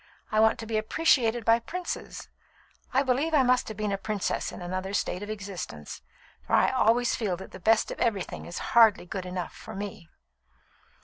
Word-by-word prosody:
I 215 - +2
want 220 +1 +5
to 225 - -7
be 220 -1 0
appreciated 235 -2 +2
by 230 0 +5
princes. 355 +9 -6 0.6
I 265 +2 +3
believe 280 +5 +1
I 275 - +5
must 250 0 +2
have 220 - -7
been 210 -1 -1
a 195 - -1
princess 210 -1 -2
in - - -9
another 185 +2 -4
state 180 - -1
of 205 - -6
existence, 190 - -6 0.4
for - - -7
I - - +4
always 235 +2 +3
feel 195 -6 -1
that 190 - -10
the - - -10
best 220 +4 +3
of - - -7
everything 205 -6 -1
is 175 - -6 0.2
hardly 225 -6 +6
good 185 0 -5
enough 180 -1 -4
for - - -10
me." 195 -4 -7
215 Hz, 190 wpm, -27 LUFS, 190-235 Hz, 0.6 s, hardly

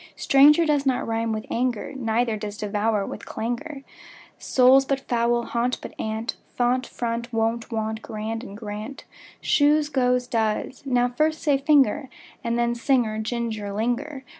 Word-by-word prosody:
Stranger 295 +4 +5
does 295 -3 +2
not 265 -3 0
rime 225 0 -1
with 215 0 -3
anger, 245 +1 -1
Neither 230 -2 0
does 210 0 -6
devour 210 -1 0
with - - -7
clangour. 245 +5 -4 0.6
Soul, 260 +1 +5
but 275 -1 0
foul 240 -1 +1
and - - -10
gaunt, 240 +1 0
but - - -9
aunt; 220 +1 -3 0.2
Font, 245 +1 +1
front, 235 0 -4
wont; 225 +1 -1
want, 220 0 -2
grand, 225 +1 -5
and, 205 -5 -9
grant, 215 +4 -7 0.4
Shoes, 295 +1 +3
goes, 250 -3 +1
does.) 225 +1 -1
Now 245 -1 +3
first 310 +6 0
say: 285 -3 +3
finger, 275 -2 +3 0.3
And 235 0 -1
then: 235 0 +1
singer, 235 -3 +1
ginger, 220 -2 -3
linger. 245 +7 -2
235 Hz, 155 wpm, -24 LUFS, 220-265 Hz, 0.6 s, Stranger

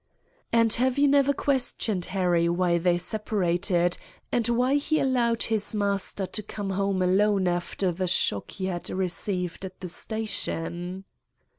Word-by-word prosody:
"And 230 -1 +4
have 260 0 +2
you 285 0 +5
never 280 0 +4
questioned 250 -9 0
Harry 175 -3 +1
why 175 0 +2
they 175 0 +2
separated 180 -3 0 0.3
and 240 -1 +1
why 245 +3 +2
he 310 +2 +1
allowed 240 -3 +2
his 220 -1 0
master 200 -1 0
to 215 - -4
come 205 -1 -5
home 195 -1 0
alone 195 +1 +3
after 175 +1 -1
the 185 +2 -2
shock 105 - +1
he 190 - -5
had 175 -2 -3
received 180 -1 -2
at 185 -1 -8
the 185 - -5
station?" 180 -3 -4
195 Hz, 145 wpm, -26 LUFS, 180-225 Hz, 0.3 s, you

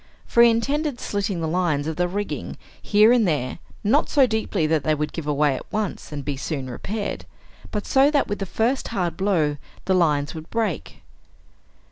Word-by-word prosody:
For 235 - +3
he 235 - +8
intended 275 +4 0
slitting 200 -3 -2
the 160 - -1
lines 160 -4 0
of 160 0 -3
the 180 +2 +1
rigging 205 +3 -4 0.2
here 210 +2 +5
and 240 -5 +4
there, 145 -3 -1 0.2
not 255 +9 +2
so 280 -3 +5
deeply 220 -7 -1
that 155 -2 +1
they 155 +2 +2
would 150 0 -3
give 165 -3 -5
way 145 -1 +2
at - - -9
once 215 -6 -3
and 145 -2 -5
be 145 -1 -2
soon 135 -2 -4
repaired, 205 - -4 0.4
but 210 -1 -3
so 270 +1 +4
that 295 -2 +2
with 205 - -3
the 195 - -3
first 240 +8 0
hard 175 -4 -2
blow 165 -7 +1 0.3
the 190 - +2
lines 150 -5 +2
would 160 0 -9
break. 220 -8 -3
185 Hz, 190 wpm, -23 LUFS, 155-220 Hz, 0.4 s, he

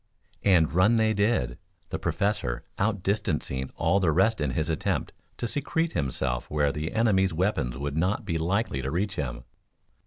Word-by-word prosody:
And 85 -6 +4
run 95 +7 +4
they 110 -1 +3
did, 100 - +1 0.3
the 80 - -3
Professor 80 - -1 0.2
outdistancing 95 -10 -1
all 90 +5 +2
the 90 -5 +2
rest 95 +5 +2
in 75 - +1
his 75 +4 -1
attempt 80 -1 -1 0.3
to 120 - -2
secrete 160 +6 0
himself 65 -3 -2
where 75 -1 +2
the 75 +7 -4
enemy's 95 -6 +3
weapons 80 - 0
would 70 +1 -3
not 95 +8 0
be 85 -4 -1
likely 90 - 0
to 65 - -3
reach 95 +6 -1
him. - - -3
85 Hz, 160 wpm, -27 LUFS, 75-105 Hz, 0.3 s, And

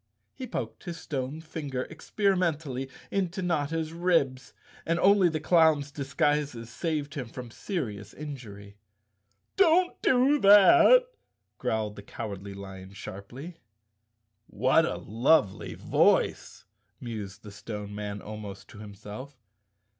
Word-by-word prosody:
He 260 - -7
poked 115 - -5
his 170 -2 -6
stone 140 0 -4
finger 145 -5 -4
experimentally 160 - -1 0.2
into 190 -1 -1
Notta's 160 -1 -1
ribs, 165 -7 +1 0.3
and 165 +1 0
only 195 -1 +5
the 155 -1 -2
clown's 155 -3 +3
disguises 140 -3 -1
saved 150 -3 -2
him 130 -5 -5
from 120 0 -9
serious 110 - -4
injury. 105 -9 -9 0.4
" 100 +1 -47
Don't 360 -1 +4
do 265 +3 +4
that," 320 - +8 0.6
growled 110 -2 -1
the - - -7
Cowardly 100 -2 -7
Lion 95 -1 -9
sharply. 120 - -9 0.5
" 110 -1 -50 0.2
What 145 +5 +5
a - - -3
lovely 115 -1 +1
voice," - - +1 0.3
mused 105 -4 -7
the 105 - -10
Stone 105 0 -7
Man 105 -1 -5
almost 105 -2 -8
to 105 - -12
himself. 105 +6 -9
135 Hz, 120 wpm, -28 LUFS, 105-165 Hz, 0.6 s, that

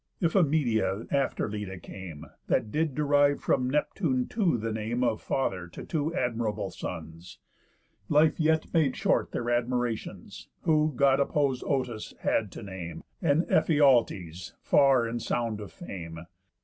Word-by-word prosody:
Iphimedia 140 - +2
after 140 -5 0
Leda 105 -3 -5
came, 85 -3 -9 0.2
That 105 - +1
did 155 -1 0
derive 145 -1 +3
from 125 0 +1
Neptune 140 -2 0
too 190 - +1
the 115 0 -3
name 110 +3 -2
Of 110 -3 0
father 95 -10 -1
to 85 - -9
two 155 -1 -1
admirable 115 -3 -1
sons. 80 +2 -8 0.7
Life 155 +3 +4
yet 160 0 +1
made 155 -6 +3
short - - +1
their - - -2
admiratións, 120 -1 -2
Who 155 -1 +2
God 135 +1 +4
opposéd 140 -2 +1
Otus 125 -6 -2
had 105 -4 0
to - - -8
name, 95 -4 -7 0.2
And 160 -1 +3
Ephialtes 115 - +2
far 135 -4 +4
in 120 +1 -3
sound 115 -2 -2
of 105 - -8
fame. 85 - -8
125 Hz, 135 wpm, -28 LUFS, 105-145 Hz, 0.7 s, Life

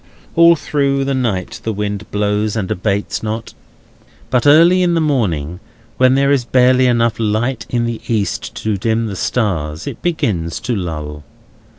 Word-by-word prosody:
All 170 0 +7
through 140 -3 0
the 140 - -1
night 115 -8 -2
the 115 - -1
wind 105 -1 -4
blows, 105 +1 -1
and 100 -4 -2
abates 100 +2 -2
not. 110 +1 -5 0.8
But 125 +2 +2
early 170 +5 +6
in 175 -1 +2
the - - +2
morning, 90 - -1 0.4
when 130 0 +4
there 140 +1 +2
is 140 -3 +2
barely 125 +1 +3
enough 115 -2 +1
light 115 +3 -1
in 120 -1 0
the 115 -1 -4
east 110 -4 -2
to 110 -2 0
dim 115 +2 0
the 105 -3 -4
stars, 85 -9 -2
it - - -7
begins 100 - -1
to 120 - -2
lull. 75 -5 -5
115 Hz, 165 wpm, -17 LUFS, 100-130 Hz, 0.8 s, All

